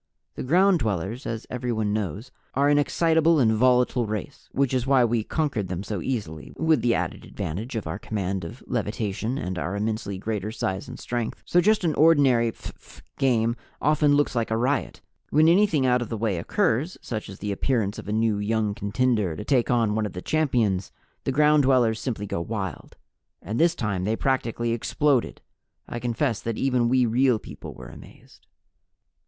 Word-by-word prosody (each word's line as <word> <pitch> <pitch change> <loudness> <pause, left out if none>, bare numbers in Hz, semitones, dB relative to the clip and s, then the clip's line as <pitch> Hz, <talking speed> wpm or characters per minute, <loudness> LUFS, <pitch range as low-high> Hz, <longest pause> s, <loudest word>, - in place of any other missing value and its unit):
The - - -6
Ground 180 +6 +4
Dwellers, 110 - -2
as 115 -1 -4
everyone 120 -4 -1
knows, 105 - -3 0.2
are 140 +2 +3
an 145 0 +4
excitable 160 +2 +3
and 115 -4 +4
volatile 125 +1 +3
race 110 +6 -6
(which 135 -1 0
is 130 0 0
why 135 -3 +5
we 115 -1 0
conquered 130 - -1
them 90 +1 -4
so 105 0 -4
easily, 85 - -4
with 160 -5 +2
the 120 -1 +2
added - - -3
advantage 110 - -5
of 110 - -3
our 80 - -4
command 95 -3 -3
of 105 +10 -9
levitation 110 +1 -2
and 90 -8 -3
our 90 +3 -3
immensely 105 -1 -2
greater 105 +1 -3
size 95 -3 -3
and 125 - -8
strength), 120 -2 -4
so 175 - +3
just 215 +2 +3
an 165 -3 +1
ordinary 135 -7 +4
phph - - -12 0.2
game 115 -3 +2 0.2
often 150 0 +3
looks 145 -2 +1
like 115 -1 0
a 110 - 0
riot. 130 +4 -1 0.3
When 155 +2 +4
anything 170 -5 +4
out 125 -1 +3
of 120 - -4
the 115 - -3
way 105 -5 -1
occurs, 160 - 0
such 110 -4 -5
as 95 - -9
the 105 0 -4
appearance 105 -1 -1
of - - -10
a - - -3
new 110 -1 +1
young 105 0 0
contender 105 -3 0
to 105 - -7
take 125 -2 +2
on 115 -4 +2
one 110 0 0
of 100 - -10
the 90 - -6
champions, 120 -12 0 0.3
the - - +1
Ground 150 +2 +4
Dwellers 125 -5 +3
simply 110 -6 -3
go 85 - -3
wild. 95 -4 -5 0.4
And 110 +3 -4
this 170 0 +4
time 100 -6 -2
they 110 +2 +1
practically 120 -2 -1
exploded. 130 +3 0 0.5
I 120 - -5
confess 120 0 -1
that 115 -1 -3
even 125 -3 +1
we 130 0 +3
Real 125 +1 +3
People - - -10
were - - -10
amazed. - - -16
115 Hz, 185 wpm, -25 LUFS, 105-135 Hz, 0.5 s, why